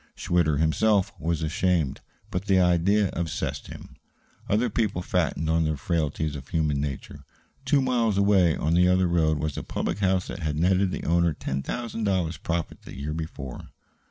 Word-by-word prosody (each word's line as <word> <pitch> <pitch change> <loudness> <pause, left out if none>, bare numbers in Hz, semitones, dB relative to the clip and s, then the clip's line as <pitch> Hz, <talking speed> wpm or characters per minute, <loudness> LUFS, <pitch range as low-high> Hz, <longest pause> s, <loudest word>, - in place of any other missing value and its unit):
Schwitter 85 -4 +1
himself 95 +6 +2
was 80 -1 -1
ashamed; 80 -2 0 0.3
but 90 +2 -3
the 95 -2 +4
idea 90 +3 +3
obsessed 80 -2 -3
him. - - -11 0.5
Other 110 +4 +2
people 105 -5 -1
fattened 80 -2 0
on 80 +1 +2
the 80 -1 -1
frailties 75 -1 -1
of 70 -1 -8
human 75 -3 0
nature. 70 -2 -5 0.4
Two 140 0 +3
miles 120 -5 +1
away, 100 -5 +4
on 80 +2 0
the 90 +1 +5
other 90 0 +3
road, 80 -3 +2
was 75 -1 -3
a - - -7
public - - -3
house 95 -2 +1
that 95 - -5
had 75 -3 -2
netted 95 +3 +3
the - - -5
owner 85 0 +2
ten 70 -1 -3
thousand 115 - -4
dollars 90 -5 0
profit 85 -1 -3
the - - -11
year 75 +2 -3
before. 75 -5 -6
85 Hz, 175 wpm, -26 LUFS, 80-95 Hz, 0.5 s, the